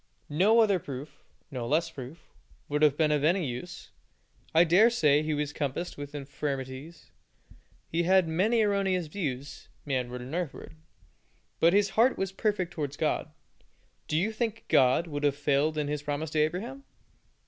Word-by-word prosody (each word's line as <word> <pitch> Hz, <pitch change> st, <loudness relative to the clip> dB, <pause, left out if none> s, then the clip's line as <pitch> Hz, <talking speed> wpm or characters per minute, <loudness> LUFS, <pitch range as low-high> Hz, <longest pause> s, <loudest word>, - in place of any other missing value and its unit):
No 200 Hz, +10 st, +4 dB
other 200 Hz, -4 st, +3 dB
proof 140 Hz, 0 st, -8 dB, 0.3 s
no 125 Hz, -3 st, -4 dB
less 165 Hz, +4 st, +1 dB
proof 135 Hz, +3 st, -11 dB, 0.4 s
would 150 Hz, +1 st, -1 dB
have 150 Hz, -2 st, +4 dB
been 155 Hz, -2 st, +3 dB
of 150 Hz, -1 st, +1 dB
any 175 Hz, +3 st, +2 dB
use. 140 Hz, +8 st, -7 dB, 0.6 s
I 165 Hz, +1 st, +6 dB
dare 180 Hz, +7 st, +5 dB
say 150 Hz, -11 st, +3 dB
he 155 Hz, 0 st, -1 dB
was 145 Hz, 0 st, -2 dB
compassed 150 Hz, +5 st, -3 dB
with 145 Hz, 0 st, -8 dB
infirmities, 140 Hz, +2 st, -6 dB, 0.8 s
had 175 Hz, +2 st, +3 dB
many 205 Hz, +8 st, +2 dB
erroneous 195 Hz, -4 st, +1 dB
views, 145 Hz, -5 st, -5 dB, 0.2 s
manward 125 Hz, -3 st, -2 dB
and 130 Hz, +4 st, -8 dB
earthward, 170 Hz, -, -4 dB, 0.9 s
but 170 Hz, +2 st, +5 dB
his 205 Hz, 0 st, +3 dB
heart 240 Hz, +4 st, +3 dB
was 195 Hz, -1 st, -2 dB
perfect 190 Hz, -3 st, -1 dB
towards 145 Hz, -4 st, -4 dB
God. -, -, -1 dB, 0.8 s
Do 155 Hz, -, 0 dB
you 195 Hz, +7 st, +1 dB
think 225 Hz, 0 st, -3 dB
God 130 Hz, +5 st, +4 dB
would 145 Hz, -3 st, -5 dB
have 145 Hz, -1 st, +2 dB
failed 145 Hz, +2 st, +1 dB
in 150 Hz, -1 st, -1 dB
His 150 Hz, 0 st, -2 dB
promise 145 Hz, +1 st, -3 dB
to 155 Hz, -, 0 dB
Abraham? 200 Hz, -, -2 dB
155 Hz, 160 wpm, -28 LUFS, 145-185 Hz, 0.9 s, I